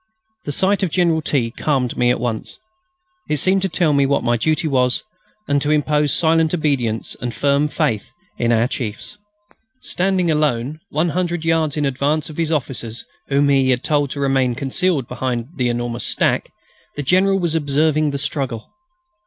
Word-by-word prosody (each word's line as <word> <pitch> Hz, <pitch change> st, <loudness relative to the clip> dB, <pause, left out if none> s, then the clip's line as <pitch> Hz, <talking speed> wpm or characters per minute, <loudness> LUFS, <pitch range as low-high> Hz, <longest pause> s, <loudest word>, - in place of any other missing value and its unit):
The 145 Hz, -, -2 dB
sight 190 Hz, +7 st, +1 dB
of 190 Hz, -, +1 dB
General 165 Hz, -1 st, +2 dB
T. 130 Hz, -6 st, 0 dB
calmed 130 Hz, -2 st, -1 dB
me 120 Hz, -, +2 dB
at 125 Hz, -, +1 dB
once. 115 Hz, -2 st, -4 dB, 0.7 s
It 150 Hz, -, +1 dB
seemed 190 Hz, +6 st, +3 dB
to 195 Hz, -, 0 dB
tell 165 Hz, -3 st, +2 dB
me 140 Hz, -1 st, +3 dB
what 140 Hz, -, +1 dB
my 120 Hz, 0 st, +2 dB
duty 155 Hz, +6 st, 0 dB
was, 125 Hz, -3 st, +1 dB, 0.4 s
and 140 Hz, 0 st, +1 dB
to 145 Hz, -, 0 dB
impose 150 Hz, -1 st, +2 dB
silent 160 Hz, 0 st, +3 dB
obedience 130 Hz, -9 st, -1 dB
and 120 Hz, 0 st, -2 dB
firm 140 Hz, +5 st, +1 dB
faith 110 Hz, -7 st, -1 dB, 0.3 s
in 120 Hz, 0 st, +2 dB
our 115 Hz, +1 st, +3 dB
chiefs. 125 Hz, -, -5 dB, 0.6 s
Standing 185 Hz, -2 st, +1 dB
alone, 150 Hz, -1 st, 0 dB
100 170 Hz, +2 st, -1 dB
yards 160 Hz, -2 st, +1 dB
in 150 Hz, -, +1 dB
advance 140 Hz, +3 st, -1 dB
of 150 Hz, -, -12 dB
his 165 Hz, -1 st, 0 dB
officers, 120 Hz, -6 st, -2 dB, 0.2 s
whom 140 Hz, +1 st, +2 dB
he 135 Hz, -2 st, +3 dB
had 125 Hz, -1 st, +1 dB
told 145 Hz, -2 st, +1 dB
to 140 Hz, -, -5 dB
remain 135 Hz, -3 st, +1 dB
concealed 140 Hz, +1 st, 0 dB
behind 125 Hz, -1 st, -3 dB
the 125 Hz, -2 st, +1 dB
enormous 120 Hz, 0 st, -3 dB
stack, -, -, 0 dB, 0.5 s
the 145 Hz, -, -3 dB
General 190 Hz, +6 st, +3 dB
was 170 Hz, -4 st, -1 dB
observing 155 Hz, 0 st, +1 dB
the 140 Hz, -, -2 dB
struggle. 135 Hz, -5 st, -4 dB
145 Hz, 170 wpm, -20 LUFS, 125-160 Hz, 0.7 s, seemed